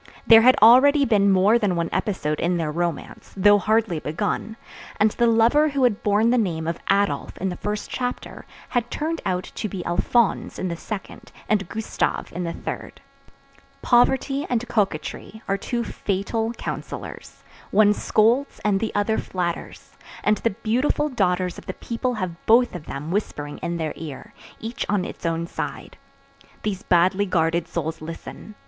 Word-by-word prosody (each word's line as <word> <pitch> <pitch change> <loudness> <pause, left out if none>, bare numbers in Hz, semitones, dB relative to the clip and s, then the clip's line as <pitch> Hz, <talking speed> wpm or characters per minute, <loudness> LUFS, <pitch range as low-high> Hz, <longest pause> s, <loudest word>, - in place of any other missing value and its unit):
There 225 -1 +8
had 255 +2 +6
already 275 +5 +7
been 205 -4 +3
more 195 +5 +4
than 200 -5 +1
one 170 -1 -1
episode 155 -8 -1
in 175 +1 +1
their 160 -2 -1
romance, 170 0 -4
though 205 +2 +6
hardly 215 -4 +1
begun; 205 +8 -3 0.4
and 210 +1 +4
the 235 - +1
lover 235 +7 +4
who 275 -2 0
had 235 -5 +2
borne 210 +3 +3
the 250 - +3
name 165 -7 -1
of 165 - -2
Adolph 200 +1 +1
in 190 - -2
the 180 - -4
first 210 +3 -4
chapter 250 -1 -5 0.2
had 240 -1 -1
turned 320 +2 -3
out 180 -1 -2
to 215 - -4
be 185 -3 -6
Alphonse 225 +6 +1
in 185 - -2
the 170 - -3
second, 195 +3 -8 0.2
and 200 -4 0
Gustave 220 0 -2
in 180 0 -2
the 170 - -2
third. - - -7 0.8
Poverty 265 +3 +3
and 245 0 -1
coquetry 210 +2 -2
are 195 - +1
two 235 +4 -3
fatal 220 +3 -2
counsellors; - - -7 0.3
one 210 0 +5
scolds 230 +7 +1
and 200 -2 +2
the 225 - -2
other 205 +2 +1
flatters, 175 -2 -5 0.3
and 210 0 +3
the 230 - 0
beautiful 255 +6 +1
daughters 185 -7 0
of - - -17
the 185 - -4
people 245 +1 -3
have 185 -5 -5
both 240 +2 +5
of 175 -4 -8
them 150 +4 -5
whispering 145 -7 -3
in 170 0 -3
their 160 -2 -3
ear, 165 +7 -9 0.3
each 225 +2 -4
on 200 -3 +1
its - - -5
own 165 0 -1
side. - - -6 0.7
These 195 -3 -2
badly 185 +3 +2
guarded 165 -1 +1
souls 160 -2 -4
listen. 165 +6 -9
205 Hz, 165 wpm, -23 LUFS, 175-230 Hz, 0.8 s, There